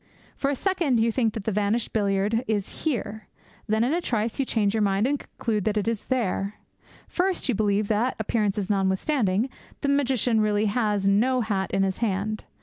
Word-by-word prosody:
For 275 - -1
a 285 - 0
second 335 - +1
you 230 +1 +3
think 225 -2 0
that 215 -3 -5
the 220 - 0
vanished 210 +3 0
billiard 200 -1 +1
ball 225 0 +1
is 210 +4 -3
here. 220 -7 -2 0.4
Then, 220 +1 +2
in 255 +5 +1
a 345 - +1
trice, 230 -6 -1
you 275 - +2
change 210 -5 +1
your 220 - +1
mind, 200 +1 +2
and 285 +2 +1
conclude 215 -3 -3
that 215 0 +1
it 210 - 0
is 230 -3 -1
there! 210 -5 -1 0.5
First, 370 -2 0
you 255 - +2
believe 205 -1 +1
that, 225 +4 +1
appearances 210 -3 0
notwithstanding, 200 +3 +1 0.3
the 280 - 0
magician 255 -5 +2
really 210 0 +2
has 210 -2 +1
no 245 +6 +3
hat 200 -4 -1
in 195 - +1
his 190 -1 -1
hand. 215 -1 -1
215 Hz, 195 wpm, -25 LUFS, 205-245 Hz, 0.5 s, you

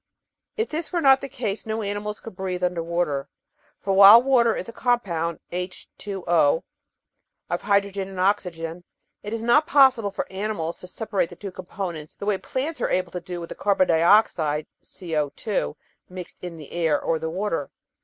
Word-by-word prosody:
If 445 +1 -1
this 315 +1 -4
were 350 - 0
not 270 -3 +5
the 275 - -6
case 225 -6 -4
no 220 0 -2
animals 205 +1 -3
could 225 - -10
breathe 185 -1 -3
under 180 -1 0
water, 165 -5 -1 0.5
for 195 - -1
while 200 +3 +10
water 240 -3 +3
is - - -4
a 230 - -8
compound 180 -11 0
(H^O) 185 +2 -6 1.3
of - - -1
hydrogen 200 -1 0
and 190 -1 -8
oxygen, 175 -3 -1 0.4
it 210 - -7
is 225 0 -3
not 290 +6 +4
possible 260 -7 +5
for 195 - -4
animals 190 -4 -3
to 180 - -10
separate 205 -2 -2
the 175 - -11
two 195 +2 -7
components 175 -4 -6
in - - -36
the - - -6
way 205 -2 +1
plants 285 +4 -3
are - - +1
able 185 -1 0
to 180 - -5
do 175 0 -6
with 170 - -7
the - - -5
car 200 -1 +1
bon 185 - +4
dioxide 160 -3 +3 0.2
(CCh) 155 - -3 0.3
mixed 180 -1 -9
in 175 -2 -6
the 150 -3 -11
air 165 -4 +1
or 165 -1 -1
the 160 - -3
water. 170 -4 -2
190 Hz, 185 wpm, -24 LUFS, 170-220 Hz, 1.3 s, while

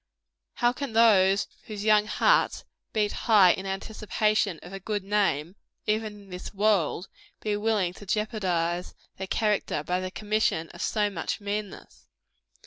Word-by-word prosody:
How 240 0 +2
can 275 -2 -5
those 200 -4 +5 0.2
whose 210 -2 -6
young 210 -1 +4
hearts - - +2 0.3
beat 210 -2 +1
high 205 -6 +5
in 190 +2 -3
anticipation 210 -1 -1
of 175 +3 -10
a 195 - -5
good 205 +1 -3
name, 195 -5 0 0.3
even 215 -1 -2
in 195 - -18
this 180 +3 -8
world, 195 -4 +1 0.3
be 210 -1 -1
willing 205 -4 0
to 205 - -13
jeopardize 180 -5 -1 0.2
their 190 - -5
character 210 -8 0
by 180 +3 -1
the 185 0 -4
commission 210 -5 -1
of 175 - -10
so 210 -2 0
much 170 +2 -3
meanness! 205 -1 -6
205 Hz, 145 wpm, -27 LUFS, 185-215 Hz, 0.3 s, those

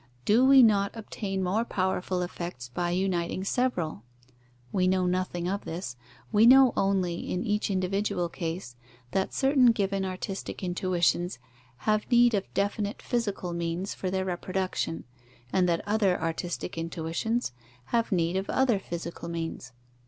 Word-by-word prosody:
Do 225 +5 +5
we 270 -1 +8
not 200 -2 +3
obtain 200 -3 -4
more 195 +5 +1
powerful 185 -3 -1
effects 170 -8 -6
by 175 +8 -2
uniting 180 0 -1
several? 195 - -1 0.7
We 185 -1 +2
know 185 0 +2
nothing 180 -1 -1
of 200 +2 -2
this: 165 -6 -5 0.4
we 220 +1 +6
know 260 -1 +8
only, 185 -3 0
in 180 - -1
each 210 -2 0
individual 190 -1 0
case, 165 -6 -5 0.4
that 190 +4 0
certain 270 -2 +4
given 200 -4 +2
artistic 190 +1 -5
intuitions 180 -1 +1 0.5
have 215 -1 +1
need 240 -1 +5
of 195 -2 -1
definite 205 +1 -1
physical 205 -7 -2
means 170 +3 -2
for 185 - -3
their 190 0 -1
reproduction, 185 -2 -2 0.5
and 180 -2 +3
that 170 +2 -1
other 205 -3 +2
artistic 165 +1 -3
intuitions 165 - -2 0.4
have 230 -1 +2
need 170 -1 +1
of 195 - -3
other 255 -6 +2
physical 170 -2 -6
means. 165 -6 -5
190 Hz, 140 wpm, -28 LUFS, 175-210 Hz, 0.7 s, we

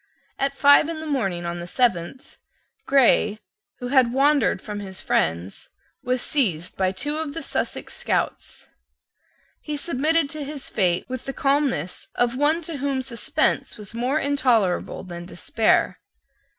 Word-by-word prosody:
At 275 0 0
five 285 +2 +6
in 325 -1 -4
the 315 - -6
morning 195 - -1
of 170 0 -3
the 170 - -6
seventh, 230 +1 -1 0.5
Grey, 240 -6 +4 0.4
who 245 -1 -5
had 260 -3 +4
wandered 275 0 +3
from 210 -1 -6
his 190 -2 -6
friends, 85 +4 -1 0.3
was 250 0 -1
seized 180 - 0
by 185 -1 +1
two 290 +11 -3
of 315 -2 -4
the 330 - -4
Sussex - - -3
scouts. - - -2 0.9
He 300 -1 -4
submitted 315 +1 +1
to 305 -2 -5
his 285 -1 -7
fate 180 -3 +1
with 255 0 -6
the 270 - -4
calmness 275 - 0
of 245 0 +1
one 305 +5 +2
to 315 -2 -5
whom 275 -1 -1
suspense 240 -3 -1
was 210 -1 -9
more 250 +5 0
intolerable 250 - +1
than 175 -2 -8
despair. 215 +4 +1
255 Hz, 150 wpm, -23 LUFS, 190-285 Hz, 0.9 s, five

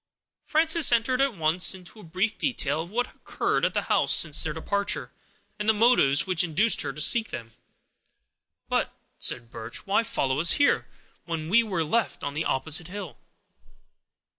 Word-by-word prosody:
Frances 320 -1 +3
entered 240 +2 +1
at 275 -5 0
once 165 +4 +1
into 185 +4 -14
a - - -13
brief 185 +6 -2
detail 160 - -1
of 170 - -9
what 245 +5 -1
had - - -21
occurred - - -2
at - - 0
the - - 0
house - - 0
since 155 -2 +4
their 155 - -2
departure, 200 +6 -3 0.5
and 210 +1 -1
the 220 - +4
motives 180 - +3
which 185 -2 +1
induced 180 +7 +1
her - - -2
to - - -10
seek 225 +8 +5
them. 115 -1 -8 1.2
"But," - - -1 0.3
said 115 -1 +1
Birch, 110 -1 -6
"why 200 +3 +2
follow 135 -12 -2
us 170 +2 +5
here, 285 - +1 0.4
when 165 -2 -5
we 225 +5 +5
were 190 -7 -2
left 220 +8 -2
on 145 0 -4
the 155 +3 -3
opposite 155 +5 0
hill?" 190 -3 -9
185 Hz, 175 wpm, -25 LUFS, 155-230 Hz, 1.2 s, seek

